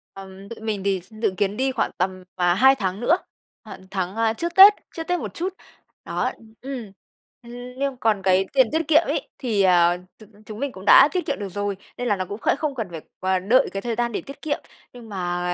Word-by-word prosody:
Ừm, 195 0 -11
tụi 230 - -8
mình 210 -3 -2
thì 195 -2 0
s 185 +5 -18
dự 195 - +1
kiến 205 0 0
đi 265 +1 +1
khoảng 255 - -1
tầm, 185 0 -2
à, 175 -1 +2
hai 265 +8 +5
tháng 195 -4 -3
nữa, 240 - +3 0.5
khoảng 190 -3 -10
tháng, 190 0 -3
a, 225 0 +1
trước 340 +8 -4
Tết, 395 +2 +10 0.2
trước 325 - -4
Tết 355 0 0
một - - -6
chút, 365 +3 -3 0.5
đó - - -1 0.3
ừm, 255 -6 -6 0.5
ừm, 235 - -12 0.3
nhưng 275 -1 -2
còn 220 -4 +1
cái 190 0 +3
tiền 260 -4 +5
tiết 320 -1 -1
kiệm 315 0 +6
ấy - - -2
thì, 225 -7 0
ờ, 175 -1 +4 0.2
chúng 215 -1 -18
chúng 215 0 -8
mình 280 +1 -2
cũng 190 - -11
đã 275 - +8
tiết 365 -1 -2
kiệm 280 - -2
được 200 -2 -5
rồi, 205 +1 -3 0.2
nên 245 - -3
là 210 - +2
nó 185 -1 -3
cũng 200 +4 -7
khẽ - - +2
không 295 -2 -2
cần 225 -6 -3
phải 165 -2 -7 0.2
q 185 0 0
đợi 250 +4 +4
cái 195 - -3
thời 235 -1 -3
gian 235 0 -1
để - - -3
tiết 275 - -12
kiệm. 300 -2 -2 0.3
Nhưng 235 -2 -12
mà 180 -2 -2
215 Hz, 240 wpm, -23 LUFS, 190-265 Hz, 0.5 s, Tết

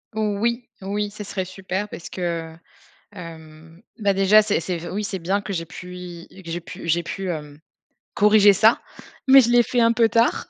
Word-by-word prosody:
Oui, 220 +3 -1
oui, 205 +2 -2
ce 210 +1 -9
serait 190 -1 -4
super 190 +2 -5
parce 170 - -9
que 170 -3 -4 0.6
hem, 165 -1 -12 0.2
bah 200 -3 +2
déjà, 195 +2 +5
c'est 210 -3 0
c'est 175 +1 -3
f 170 - -8
oui, 205 +3 -2
c'est 195 -1 -4
bien 190 +4 -1
que 200 - -6
j'aie 165 -3 -3
pu 180 +2 -10
y 180 +1 -10
que 170 - -9
j'aie 170 +1 -3
pu 170 - -10
j'aie 170 +1 +1
pu 190 +3 -5
hem, 150 -3 -6 0.6
corriger 210 0 +6
ça. 220 +4 +4 0.5
Mais 270 +1 +9
je 240 -2 +1
l'ai 240 0 +6
fait 245 +2 -1
un 230 0 +4
peu 230 -1 +3
tard, 230 +2 +1
195 Hz, 200 wpm, -22 LUFS, 170-210 Hz, 0.6 s, Mais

